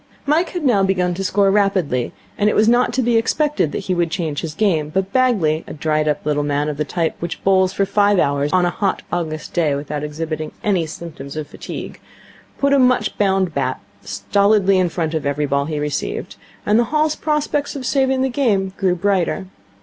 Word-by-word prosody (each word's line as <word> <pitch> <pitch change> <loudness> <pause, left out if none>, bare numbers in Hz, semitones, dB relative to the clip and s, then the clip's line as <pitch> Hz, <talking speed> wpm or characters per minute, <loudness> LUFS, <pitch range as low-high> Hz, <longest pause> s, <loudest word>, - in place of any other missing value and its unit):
Mike 315 +5 +2
had 350 -4 -4
now 230 -7 +4
begun 185 -2 +1
to 190 +2 -4
score 195 +1 +2
rapidly, 190 - +1 0.2
and 210 0 +2
it - - 0
was 215 - +4
not 240 +2 +3
to 260 - 0
be 235 -1 +3
expected 290 - +1
that - - -3
he 185 - 0
could 175 -1 0
change 160 -3 -2
his 155 -2 -5
game; 165 -8 +1
but 190 +4 -2
Bagley, 205 -12 +2
a - - -7
dried 155 0 0
up 150 -1 -1
little 150 -1 +1
man 145 +1 0
of 150 - -4
the 150 - 0
type 165 +2 -1
which 170 -1 -5
bowls 190 -1 +3
for 195 +1 0
five 205 0 +3
hours 145 -2 +1
on 180 -1 +3
a 175 - +1
hot 195 0 -1
August 155 -3 -3
day 155 -5 +1
without 145 +1 -4
exhibiting 155 +1 -4
any 185 -6 +1
symptoms 155 -3 -8
of 155 - -3
fatigue, 145 - -8 0.6
put 280 0 +2
a 280 - +5
much 250 -4 +2
bound 190 -4 +2
bat 130 -2 -1 0.2
stolidly 195 - +2
in 180 -1 +2
front 165 -1 -2
of 160 -2 -1
every 145 +1 0
ball 140 0 0
he 155 0 -3
received; 150 -1 -3 0.3
and 210 +2 +3
the 240 - +3
Hall's 305 +3 +1
prospects 300 -2 -1
of 265 -2 -5
saving 265 0 +1
the 265 - +1
game 210 -8 0
grew 185 -3 +1
brighter. 190 0 0
185 Hz, 210 wpm, -19 LUFS, 155-210 Hz, 0.6 s, a